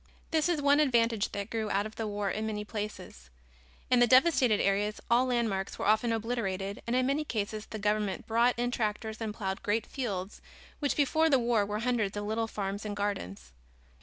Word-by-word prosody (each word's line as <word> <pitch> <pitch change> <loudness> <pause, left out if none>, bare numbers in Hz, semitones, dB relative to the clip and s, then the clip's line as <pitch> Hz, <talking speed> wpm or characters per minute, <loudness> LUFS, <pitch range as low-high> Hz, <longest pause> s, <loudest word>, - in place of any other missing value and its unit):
This 320 0 +2
is 315 -5 0
one 285 +1 +5
advantage 235 -7 +2
that 200 -1 -5
grew 220 -2 -2
out 200 +1 +1
of 215 - -8
the 225 - -3
war 205 -1 -2
in 215 +1 -2
many 210 -1 -3
places. 205 - -7 0.6
In 250 - +5
the 245 - +6
devastated 255 -4 +5
areas 205 +2 +1
all 245 +2 +4
landmarks 225 -6 -1
were - - -3
often 220 +3 +3
obliterated 210 -4 -2
and 235 - 0
in 255 0 +2
many 280 +3 +1
cases 215 -5 -3
the 220 - -6
government 210 +1 -1
brought 235 +2 +2
in 245 +1 0
tractors 220 -1 -2
and 220 -1 -2
plowed 195 -3 -4
great 215 +1 0
fields 200 -8 -4 0.4
which 285 -2 0
before 315 +3 +3
the 275 - +5
war 235 -4 +1
were 210 +1 -3
hundreds 230 -5 0
of 205 - -3
little 225 +2 -1
farms 200 -1 -4
and 210 -1 -4
gardens. 95 - -4
220 Hz, 195 wpm, -30 LUFS, 205-245 Hz, 0.6 s, the